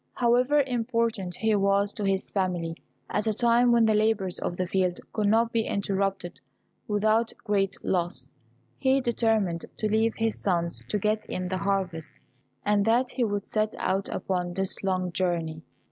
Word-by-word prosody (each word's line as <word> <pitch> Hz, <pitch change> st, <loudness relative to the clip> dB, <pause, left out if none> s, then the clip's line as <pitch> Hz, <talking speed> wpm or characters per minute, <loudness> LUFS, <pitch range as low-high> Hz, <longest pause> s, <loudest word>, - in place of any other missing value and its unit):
However 250 Hz, +4 st, +3 dB
important 230 Hz, -7 st, -1 dB
he 220 Hz, -1 st, +1 dB
was 200 Hz, 0 st, +2 dB
to 210 Hz, -, -5 dB
his 195 Hz, -1 st, 0 dB
family 175 Hz, -4 st, -1 dB, 0.3 s
at 210 Hz, +1 st, -1 dB
a 215 Hz, -, +1 dB
time 240 Hz, +1 st, +4 dB
when 235 Hz, -1 st, +5 dB
the 220 Hz, -, +3 dB
labours 210 Hz, -4 st, +1 dB
of 175 Hz, -, -3 dB
the 185 Hz, -, 0 dB
field 180 Hz, -1 st, 0 dB
could 210 Hz, -2 st, +1 dB
not 225 Hz, +2 st, +3 dB
be 230 Hz, -, +2 dB
interrupted 195 Hz, -2 st, -2 dB, 0.5 s
without 215 Hz, +2 st, +2 dB
great 200 Hz, -3 st, +1 dB
loss, 145 Hz, -7 st, -2 dB, 0.4 s
he 265 Hz, +1 st, +3 dB
determined 225 Hz, -8 st, 0 dB
to 215 Hz, -, 0 dB
leave 220 Hz, +2 st, +1 dB
his 225 Hz, -1 st, -1 dB
sons 170 Hz, -3 st, 0 dB
to 210 Hz, -, 0 dB
get 215 Hz, +1 st, 0 dB
in 185 Hz, 0 st, -4 dB
the 185 Hz, 0 st, -1 dB
harvest, 185 Hz, -5 st, -2 dB, 0.5 s
and 205 Hz, -1 st, +3 dB
that 240 Hz, +3 st, +3 dB
he 250 Hz, -, -1 dB
would 205 Hz, -3 st, -1 dB
set 215 Hz, 0 st, -1 dB
out 195 Hz, +1 st, -1 dB
upon 180 Hz, -2 st, -2 dB
this 195 Hz, 0 st, -1 dB
long 185 Hz, -2 st, 0 dB
journey. 165 Hz, -3 st, -1 dB
205 Hz, 165 wpm, -27 LUFS, 185-225 Hz, 0.5 s, when